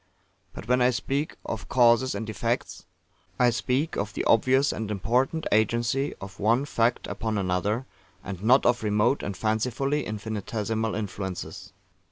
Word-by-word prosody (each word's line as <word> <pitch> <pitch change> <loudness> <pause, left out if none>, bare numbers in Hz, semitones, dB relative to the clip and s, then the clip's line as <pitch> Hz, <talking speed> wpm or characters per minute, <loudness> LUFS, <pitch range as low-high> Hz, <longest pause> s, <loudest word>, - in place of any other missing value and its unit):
But 110 - -8
when 125 +1 +3
I 125 - +5
speak 135 +5 -2
of 110 - -5
Causes 120 0 +4
and 105 +2 -4
Effects, 115 +3 -3 0.5
I 125 -1 +4
speak 130 +6 -1
of 105 +1 -3
the - - -1
obvious 130 +5 +4
and 110 -1 -4
important 125 - 0
agency 120 +6 +1
of 95 0 -10
one 115 +6 +2
fact 120 -3 +1
upon 110 +2 -3
another, 100 +6 0 0.4
and 95 0 -7
not 125 +5 +5
of 120 0 +3
remote 105 +5 +2
and 100 -2 -4
fancifully 125 +7 0
infinitesimal 110 +1 -3
influences. 95 -3 -5
115 Hz, 145 wpm, -26 LUFS, 105-125 Hz, 0.5 s, I